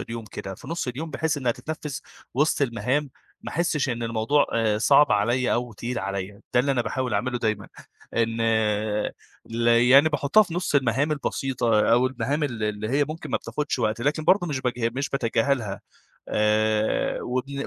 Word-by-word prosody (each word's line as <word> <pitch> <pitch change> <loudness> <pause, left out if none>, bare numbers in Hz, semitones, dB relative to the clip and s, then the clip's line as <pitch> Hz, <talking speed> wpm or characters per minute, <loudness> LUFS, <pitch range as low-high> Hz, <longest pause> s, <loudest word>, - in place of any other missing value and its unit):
اليوم 115 -1 -6
كده، 95 -2 -7
في - - -13
نُصّ 165 -5 -3
اليوم 155 +6 -5
بحيث 160 -1 -1
إنها 125 -4 0
تتنفّذ 150 0 -6 0.4
وسط 145 +1 +2
المهام، 130 +3 0 0.3
ما - - -7
أحسِّش 155 -3 0
إن 120 -2 -2
الموضوع 115 +5 +1
آآ 110 -2 +1
صعب 140 +5 +5
عليَّ 120 +5 +2
أو 120 -1 -1
تقيل 120 +3 -4
عليَّ، 100 +1 -4
ده 125 - +6
اللي 140 +2 +1
أنا 125 - +1
باحاول 125 0 -2
أعمله 125 +4 -1
دايمًا. 110 -3 -2 0.5
إن 115 0 0 1.1
ل 115 +1 -2
يعني 125 +6 +6
باحُطّها 150 +7 +4
في 170 -4 -6
نُصّ 180 -4 -2
المهام 135 +3 +2
البسيطة 125 -6 0
أو 125 +2 +4
المهام 140 +4 -2
ال 120 -6 -4
اللي 105 0 -2
هي 145 +2 +3
ممكن 155 +3 -7
ما - - +2
بتاخدش 150 -3 -3
وقت، 110 -1 0
لكن 150 +4 0
برضه 180 0 +4
مش 140 -5 -2
باجه 120 -2 -1
مش 140 +2 -2
باتجاهلها، 115 -5 0 0.5
آآ، 110 0 +1
وبن 135 +3 -3
125 Hz, 175 wpm, -25 LUFS, 115-145 Hz, 1.1 s, ده